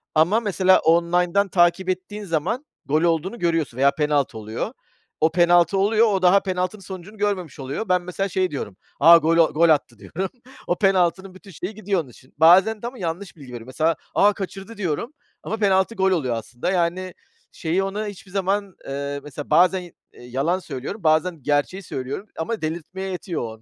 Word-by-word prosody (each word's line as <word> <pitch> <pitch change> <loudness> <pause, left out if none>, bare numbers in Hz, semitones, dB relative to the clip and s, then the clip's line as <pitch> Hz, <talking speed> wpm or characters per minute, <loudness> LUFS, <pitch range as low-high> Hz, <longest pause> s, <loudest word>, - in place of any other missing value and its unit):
Ama 175 +9 +4
mesela 190 -4 +3
online'dan 175 +4 +2
takip 175 +1 +2
ettiğin 190 +3 -4
zaman 195 - -2 0.2
gol 155 +3 +1
olduğunu 170 +7 0
görüyorsun 165 -8 -1
veya 140 +1 +4
penaltı 145 -6 0
oluyor. 110 +1 -5 0.5
O 160 +1 +4
penaltı 175 +2 +4
oluyor. 220 +3 +4
O 195 -3 +1
daha 185 +2 +6
penaltı 185 +2 -3
sonucunu 190 +3 -10
görmemiş 195 -8 -2
oluyor. 140 +11 -5
Ben 180 -1 +3
mesela 195 +2 -3
şey 185 -2 0
diyorum. 120 -8 -6 0.2
"A, 170 +3 +9
gol 165 +1 +2
o 165 -2 +4
gol 165 +2 +4
attı 125 -7 +1
diyorum." 175 - -4 0.4
O 175 - +1
penaltının 190 -1 +1
bütün 195 +1 -14
şeyi 180 +6 -6
gidiyor 200 -4 -1
onun 135 - -13
için. 130 +2 -19
Bazen 190 +7 +5
de 235 - -4
ama 250 +1 -8
yanlış 175 +2 -4
bilgi 140 -5 -13
veriyorum. 120 -1 -9
Mesela 160 +5 +1 0.2
"A, 205 +1 +5
kaçırdı." 195 +3 -7
diyorum 200 - -3 0.3
ama 220 - -3
penaltı 195 +1 +2
gol 190 0 +2
oluyor 130 -9 0
aslında. 120 - -4
Yani 180 +1 -1 0.4
şeyi 175 +4 -1
ona 205 +2 -3
hiçbir 195 -2 -10
zaman, 195 0 -1
ııı, 140 +1 -4
mesela 145 0 -8
bazen, 185 +1 +4
iii, 175 -2 -12 0.2
yalan 135 +9 -2
söylüyorum, 175 - -7
bazen 155 -1 +1
gerçeği 150 +7 0
söylüyorum 135 +9 -5
ama 215 +6 -3
delirtmeye 175 +4 -4
yetiyor 180 -2 -4
o - - -3
onu. 110 0 -11
180 Hz, 185 wpm, -22 LUFS, 155-195 Hz, 0.5 s, A